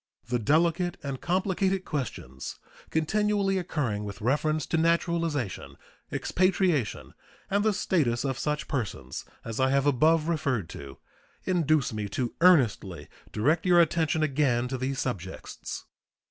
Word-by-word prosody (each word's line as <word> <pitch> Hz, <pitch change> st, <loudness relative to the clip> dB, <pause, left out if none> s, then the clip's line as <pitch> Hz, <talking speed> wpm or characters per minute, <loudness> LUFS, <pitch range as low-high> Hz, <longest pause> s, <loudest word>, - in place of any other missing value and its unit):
The 120 Hz, 0 st, 0 dB
delicate 170 Hz, -, +2 dB
and 135 Hz, -2 st, -4 dB
complicated 190 Hz, +1 st, 0 dB
questions 110 Hz, -, -5 dB, 0.3 s
continually 195 Hz, +4 st, +1 dB
occurring 130 Hz, -, -2 dB
with 100 Hz, -2 st, -7 dB
reference 150 Hz, +5 st, +1 dB
to 165 Hz, -, 0 dB
naturalization, 165 Hz, -, 0 dB, 0.3 s
expatriation, 180 Hz, -, 0 dB, 0.4 s
and 200 Hz, +1 st, +2 dB
the 215 Hz, -, +3 dB
status 145 Hz, -, +1 dB
of 135 Hz, -1 st, -2 dB
such 150 Hz, +1 st, -2 dB
persons 105 Hz, -, -4 dB, 0.2 s
as 115 Hz, +1 st, -4 dB
I 130 Hz, 0 st, +3 dB
have 140 Hz, +1 st, +2 dB
above 155 Hz, +4 st, +3 dB
referred 140 Hz, -, -1 dB
to 70 Hz, -1 st, -9 dB, 0.5 s
induce 155 Hz, -8 st, +1 dB
me 105 Hz, -1 st, -3 dB
to 120 Hz, +4 st, -2 dB
earnestly 110 Hz, -, +3 dB, 0.2 s
direct 150 Hz, +10 st, +1 dB
your 175 Hz, -1 st, +6 dB
attention 160 Hz, -1 st, +2 dB
again 135 Hz, -5 st, +1 dB
to 130 Hz, -, -2 dB
these 135 Hz, +1 st, -2 dB
subjects. 100 Hz, -9 st, -5 dB
150 Hz, 130 wpm, -28 LUFS, 120-170 Hz, 0.5 s, your